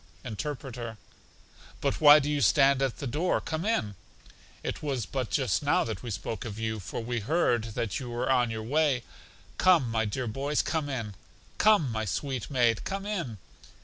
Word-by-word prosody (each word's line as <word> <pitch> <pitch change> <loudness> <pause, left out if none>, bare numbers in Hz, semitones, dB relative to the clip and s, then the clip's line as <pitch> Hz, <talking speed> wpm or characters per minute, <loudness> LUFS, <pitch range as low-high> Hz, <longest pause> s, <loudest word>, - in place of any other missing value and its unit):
Interpreter: 120 -2 -5 0.8
But - - -1
why 150 0 +10
do 145 -1 0
you 150 -1 0
stand 135 +5 +4
at 135 -3 0
the - - -5
door? 150 +8 0
Come 160 +1 -4
in; 110 - 0 0.7
it - - -4
was 135 -7 -2
but 130 +3 -3
just 115 -11 +1
now - - +2
that 95 - -5
we 120 - -6
spoke 110 +2 -4
of 110 -3 -6
you, 110 -1 -2
for 100 - -5
we 120 +1 -2
heard 115 -4 0
that 110 -5 -2
you 125 -3 -6
were 120 0 -2
on 125 -3 +3
your 110 -1 -4
way. 140 0 +1 0.6
Come, 165 -11 +4
my 110 -1 +1
dear 125 +5 -2
boys, 140 +6 -1
come 155 -3 -1
in; 115 -6 -4 0.5
come, 205 - +4
my 110 0 -2
sweet 130 +4 -3
maid, 120 -5 +2
come 195 0 -4
in. 170 - -3
125 Hz, 180 wpm, -28 LUFS, 110-145 Hz, 0.8 s, why